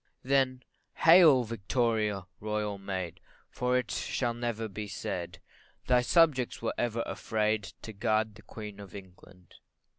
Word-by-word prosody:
CHORUS 130 - -13
Then 130 -2 +2 0.3
hail, 160 -6 +7
Victoria! 110 -2 -1
Royal 105 -1 -2
Maid, 95 -3 -4 0.3
For 125 0 +1
it 125 -2 -2 0.3
never 120 -2 -2
shall - - -2
be 105 +1 -6
said, 90 -3 -5 0.5
Thy 125 -1 +4
subjects 135 -2 +3 0.2
ever 120 -1 -1
were - - -4
afraid 110 -1 -1 0.2
To 110 - -7
guard 110 +1 0
the 110 - -15
Queen 105 -2 -9
of 100 -2 -11
England. 90 -2 -14
110 Hz, 140 wpm, -30 LUFS, 100-125 Hz, 0.5 s, hail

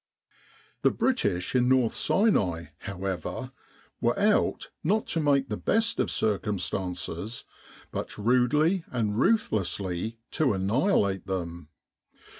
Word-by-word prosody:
The - - +5
British 100 - 0
in 125 -1 +3
North 130 -3 +3
Sinai, 90 - +1
however, 95 -3 -4 0.5
were - - +1
out - - +1
not 210 +7 +1
to 165 - 0
make 140 -3 +2
the 105 -3 -3
best 225 +1 +1
of - - +1
circumstances, 95 0 -2 0.5
but - - -5
rudely 130 - +2
and 110 -3 -1
ruthlessly 105 - 0
to 145 -7 +2
annihilate 100 - +1
them. 85 -4 -4
110 Hz, 105 wpm, -27 LUFS, 95-140 Hz, 0.5 s, The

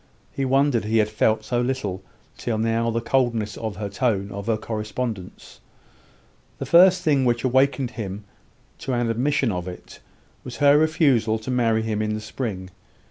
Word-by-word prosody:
He 135 - -2
wondered 135 -3 +2
he 110 +1 +1
had 105 -1 +2
felt 110 0 +1
so 120 +1 0
little 120 -7 -2 0.3
till 115 -3 -3
now 115 +1 0
the 115 0 -1
coldness 115 -4 0
of 110 -4 -5
the 105 -1 -3
tone 100 -1 -1
of 100 +1 -7
her 115 -2 +1
correspondence. 110 -2 -5 1.0
The - - -5
first 180 +1 +6
thing 145 -5 +2
which 120 -2 +1
awakened 130 0 +2
him 105 -4 -6 0.6
to 135 - -3
an 120 -1 0
admission 130 +1 0
of 90 -1 -4
it, 90 - -10 0.4
was 125 - -8
her 145 0 +5
refusal 140 -8 +2
to 110 +4 -6
marry 115 -3 +1
him 110 -1 -2
in 110 0 -1
the - - -4
spring. 105 -4 -5
115 Hz, 170 wpm, -23 LUFS, 110-130 Hz, 1.0 s, first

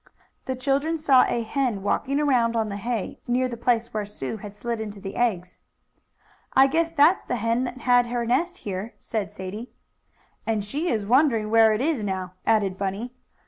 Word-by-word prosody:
The 260 - -2
children 280 +5 0
saw 280 -5 +5
a 235 - -1
hen 230 -4 -1
walking 275 +7 0
around 245 -6 +2
on 220 -2 0
the 200 - -4
hay, 230 -1 -3
near 250 +1 +1
the 245 - -5
place 235 0 0
where 215 -1 -1
Sue 205 -3 -5
had 205 0 -9
slid 230 +1 -3
into 210 -2 -6
the 195 0 -7
eggs. 185 -7 -1 0.9
"I 270 - +7
guess 325 +4 +1
that's 330 +4 +4
the - - -2
hen 230 +2 0
that 255 +1 -7
had 245 -1 +4
her 240 0 -2
nest 340 +10 0
here," 200 +3 -4
said 215 -3 -4
Sadie. 205 +6 -7 0.7
"And 215 -3 -1
she 300 +11 -2
is 215 -4 0
wondering 230 -3 +3
where 225 -1 +6
it 215 +2 0
is 285 -6 0
now," 190 -2 -3
added 200 -4 +2
Bunny. 200 +5 -3
235 Hz, 185 wpm, -25 LUFS, 210-260 Hz, 0.9 s, I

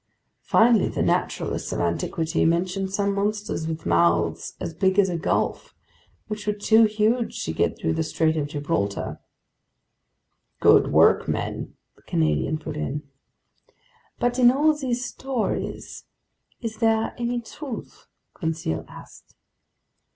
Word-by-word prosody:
"Finally, 225 -3 +4
the - - -1
naturalists - - -1
of - - -2
antiquity 155 - -1
mention 180 +3 +1
some 200 +1 0
monsters 205 -4 -2
with 160 0 -5
mouths 85 0 +1
as 165 - -4
big 190 +3 +1
as 195 -2 +5
a 175 - -2
gulf, 165 +4 -1 0.5
which 215 -1 -6
were 210 - +2
too 220 +2 +4
huge 220 +3 0
to 80 - -3
get - - 0
through 80 - -1
the - - -1
Strait 160 0 +1
of 150 -2 -1
Gibraltar." 145 -8 -2 1.4
"Good - - +5
work, - - +5
men!" - - -3 0.2
the - - -25
Canadian 80 - 0
put 155 -1 -7
in. 150 0 -3 1.1
"But 245 +1 0
in 245 -1 +7
all 300 +4 +3
these 250 -4 -2
stories, 255 -1 -4 0.6
is 225 -2 -5
there 225 -1 +1
any 240 0 -1
truth?" 240 +2 -9 0.3
Conseil 160 - -3
asked. - - -14
195 Hz, 130 wpm, -24 LUFS, 155-225 Hz, 1.4 s, in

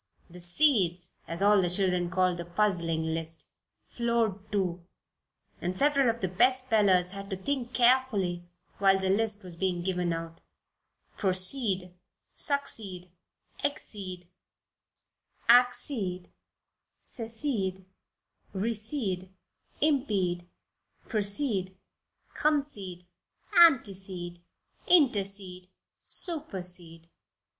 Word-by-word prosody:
The 180 - -11
"seeds," 180 - +2
as 170 +3 -1
all 205 -1 +5
the 175 - 0
children 180 -1 +1
called 185 -1 0
the - - -3
puzzling 170 -3 -1
list, 160 0 -2 0.4
floored 225 -4 -2
two, 180 -4 -2 0.8
and 180 +1 -3
several 280 -1 +3
of 230 +1 -3
the 190 - 0
best 255 +8 +2
spellers 195 -6 +3
had 195 0 -8
to 190 - -4
think 250 +4 -4
carefully 225 -8 +2 0.3
while 195 -1 +4
the 190 0 0
list 210 0 +1
was 180 -2 -10
being 180 -1 -2
given 180 -2 -1
out: 165 0 -6 0.8
"proceed, 185 -1 +2 0.4
succeed, 195 - 0 0.5
exceed, 185 -10 -5 1.2
accede, 235 -6 +3 0.7
secede, 225 -6 -4 0.7
recede, 210 -2 -2 0.5
impede, 200 - 0 0.6
precede, 205 -3 +1 0.6
concede, 245 - -2 0.5
antecede, 190 - +3 0.5
intercede, 195 - +1 0.4
supersede." 180 - 0
195 Hz, 90 wpm, -28 LUFS, 180-235 Hz, 1.2 s, all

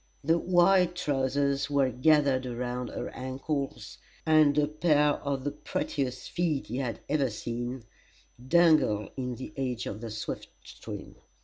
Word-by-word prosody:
The 165 +4 +3
wide 180 0 +4
trowsers 140 -3 0
were 140 -2 +2
gathered 135 0 +3
around 125 0 -3
her - - -5
ankles, 135 +2 -4 0.3
and 155 -2 +5
a 150 - +4
pair 150 -1 +3
of 140 -2 -3
the 145 - -1
prettiest 130 -3 -3
feet 165 -5 0
he 120 - -5
had 120 -5 -3
ever 140 -2 +1
seen 120 +3 -4 0.6
dangled 155 - +4
in 125 -2 -3
the 130 +6 -8
edge 125 -3 -2
of 105 +2 -5
the 115 - -5
swift 110 0 -5
stream. - - -9
140 Hz, 140 wpm, -29 LUFS, 125-155 Hz, 0.6 s, and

